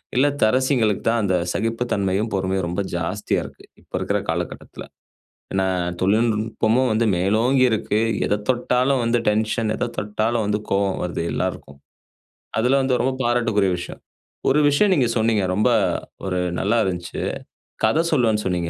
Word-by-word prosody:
இல்லத்தரசிகளுக்கு 130 Hz, -4 st, +2 dB
தான் 115 Hz, 0 st, +1 dB
அந்த 95 Hz, -2 st, +1 dB, 0.2 s
சகிப்பு 115 Hz, +3 st, -1 dB
தன்மையும், 100 Hz, +3 st, 0 dB
பொறுமையும் 95 Hz, -1 st, -1 dB
ரொம்ப 90 Hz, +4 st, -2 dB
ஜாஸ்தியா 85 Hz, +5 st, -1 dB
இருக்கு -, -, -13 dB, 0.2 s
இப்போ -, -, -9 dB
இருக்கிற -, -, 0 dB
காலகட்டத்துல. -, -, -4 dB, 0.7 s
ஏன்னா, 95 Hz, 0 st, +1 dB, 0.4 s
தொழில்நுட்பமும் 110 Hz, +4 st, +1 dB
வந்து 110 Hz, +2 st, +1 dB
மேலோங்கி 110 Hz, +9 st, +2 dB
இருக்கு. 105 Hz, -1 st, 0 dB, 0.3 s
எத 105 Hz, -, 0 dB
தொட்டாலும் 125 Hz, +1 st, +2 dB
வந்து 115 Hz, +1 st, +2 dB
டென்ஷன், 110 Hz, +1 st, 0 dB
எத 120 Hz, -, -2 dB
தொட்டாலும் 110 Hz, +2 st, -1 dB
வந்து 105 Hz, +1 st, 0 dB
கோவம் 100 Hz, 0 st, +1 dB
வருது 85 Hz, -1 st, -3 dB
எல்லாருக்கும். 70 Hz, 0 st, -4 dB, 0.8 s
அதுல 125 Hz, +4 st, +3 dB
வந்து 130 Hz, -2 st, +1 dB
ரொம்ப 130 Hz, +1 st, 0 dB
பாராட்டுக்குரிய 115 Hz, -5 st, +1 dB
விஷயம். 90 Hz, -, -8 dB, 0.5 s
ஒரு 140 Hz, +3 st, +4 dB
விஷயம் 190 Hz, +8 st, +3 dB
நீங்க 130 Hz, -4 st, +2 dB
சொன்னீங்க, 110 Hz, -2 st, +2 dB
ரொம்ப 105 Hz, +5 st, +3 dB, 0.6 s
ஒரு 90 Hz, -1 st, -1 dB, 0.2 s
நல்லா 105 Hz, +4 st, +1 dB
இருந்துச்சு. 90 Hz, -2 st, -4 dB, 0.6 s
கதை 160 Hz, -, +2 dB
சொல்வேன்னு 115 Hz, -7 st, +2 dB
சொன்னீங்க 90 Hz, -2 st, -1 dB
110 Hz, 140 wpm, -22 LUFS, 100-125 Hz, 0.8 s, ஒரு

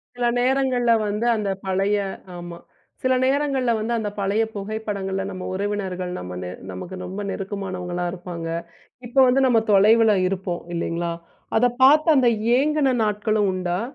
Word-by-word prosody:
சில 245 Hz, -, -1 dB
நேரங்கள்ல 255 Hz, -2 st, +2 dB, 0.2 s
வந்து, 210 Hz, +3 st, -2 dB
அந்த 210 Hz, -2 st, -2 dB, 0.2 s
பழைய 195 Hz, +2 st, +1 dB, 0.4 s
ஆமா. 175 Hz, 0 st, -8 dB, 0.5 s
சில 260 Hz, 0 st, +3 dB
நேரங்கள்ல 270 Hz, -2 st, +1 dB
வந்து, 230 Hz, +2 st, -2 dB
அந்த 210 Hz, -1 st, -2 dB
பழய 200 Hz, +3 st, +1 dB
புகைப்படங்கள்ல 200 Hz, -2 st, -3 dB
நம்ம 185 Hz, -1 st, -7 dB
உறவினர்கள், 190 Hz, -2 st, -3 dB
நம்ம 90 Hz, 0 st, -7 dB
நெ 90 Hz, -, -5 dB, 0.2 s
நமக்கு 175 Hz, -, -7 dB
ரொம்ப 190 Hz, +3 st, -5 dB
நெருக்கமானவங்களா 185 Hz, -3 st, -4 dB
இருப்பாங்க. 175 Hz, -2 st, -6 dB, 0.6 s
இப்போ 255 Hz, +3 st, +1 dB
வந்து 255 Hz, +2 st, +3 dB
நம்ம 230 Hz, -3 st, +4 dB
தொலைவில 215 Hz, +2 st, +5 dB
இருப்போம். 185 Hz, -2 st, -3 dB
இல்லீங்களா. 170 Hz, 0 st, -2 dB, 0.5 s
அத 245 Hz, -, +4 dB, 0.2 s
பாத்து 305 Hz, +4 st, +6 dB
அந்த 255 Hz, -, +4 dB, 0.3 s
ஏங்குன 285 Hz, -2 st, +2 dB
நாட்களும் 210 Hz, -1 st, +1 dB
உண்டா? 180 Hz, +1 st, -2 dB
205 Hz, 140 wpm, -23 LUFS, 185-240 Hz, 0.6 s, பாத்து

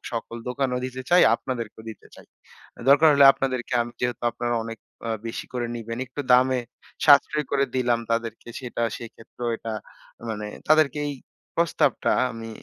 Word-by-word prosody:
সকল 115 Hz, 0 st, -4 dB
দোকানও 125 Hz, -1 st, -1 dB
দিতে 130 Hz, 0 st, -5 dB
চাই, 180 Hz, +1 st, +7 dB
আপনাদেরকেও 115 Hz, -4 st, -5 dB
দিতে 110 Hz, -, -13 dB
চাই। -, -, -15 dB, 0.6 s
দরকার 145 Hz, +3 st, +7 dB
হলে 140 Hz, -, +6 dB
আপনাদেরকে 130 Hz, -3 st, -3 dB
আমি 120 Hz, 0 st, -8 dB
যেহেতু 125 Hz, 0 st, -2 dB
আপনারা 120 Hz, +1 st, -2 dB
অনেক 115 Hz, 0 st, -7 dB, 0.3 s
আ -, -, -1 dB, 0.2 s
বেশি 115 Hz, -, -5 dB
করে 125 Hz, -1 st, -2 dB
নিবেন, 115 Hz, 0 st, -6 dB
একটু 130 Hz, +3 st, -6 dB
দামে 130 Hz, 0 st, +4 dB, 0.5 s
সাশ্রয় 150 Hz, +1 st, +5 dB
করে 140 Hz, -1 st, +2 dB
দিলাম, 120 Hz, -2 st, +2 dB
তাদেরকে 115 Hz, 0 st, -2 dB
সেটা 120 Hz, -2 st, -4 dB, 0.2 s
সেক্ষেত্রেও 115 Hz, +1 st, -7 dB
এটা 115 Hz, -, -6 dB, 0.6 s
মানে 105 Hz, -1 st, -4 dB, 0.2 s
তাদেরকে 155 Hz, -2 st, +4 dB
এই 145 Hz, -, -4 dB, 0.4 s
প্রস্তাবটা 170 Hz, -1 st, +1 dB, 0.2 s
আমি 115 Hz, 0 st, -8 dB
125 Hz, 150 wpm, -24 LUFS, 115-135 Hz, 0.6 s, চাই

